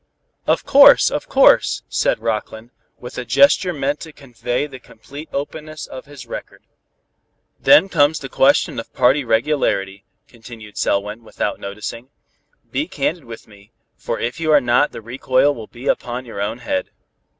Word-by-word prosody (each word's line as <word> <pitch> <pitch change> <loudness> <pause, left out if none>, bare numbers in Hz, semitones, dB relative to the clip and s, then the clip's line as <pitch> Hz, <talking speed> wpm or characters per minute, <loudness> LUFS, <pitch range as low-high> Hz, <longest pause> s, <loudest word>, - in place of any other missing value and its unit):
"Of - - +1
course, - - +7
of - - -4
course," - - +4
said - - 0
Rockland, 110 +1 -4 0.3
with 125 +1 -8
a - - -4
gesture 195 - +4
meant 145 -2 -2
to 160 - -9
convey 125 -1 -4
the 135 -3 -11
complete 145 +5 -12
openness 155 +2 -6
of 130 - -10
his 145 0 -11
record. - - -9 1.0
"Then 285 -9 +6
comes 155 -3 +2
the 140 - -7
question 135 -2 +2
of 115 - -9
party 130 +3 +3
regularity," 110 -6 0 0.2
continued 115 -3 -13
Selwyn, 105 +3 -1
without 110 - -4
noticing. 105 +5 -7 0.6
"Be 300 - -2
candid 155 +2 -3
with 115 -1 -11
me, 100 -1 -19 0.2
for, - - -4
if 120 +5 -3
you 160 -1 0
are 150 - +7
not, 125 +3 +2
the - - -9
recoil 130 +4 +1
will 115 -5 -9
be 120 +2 -10
upon 125 +1 -2
your 115 -4 -7
own 105 +3 -2
head." 115 -6 -3
125 Hz, 160 wpm, -19 LUFS, 115-145 Hz, 1.0 s, course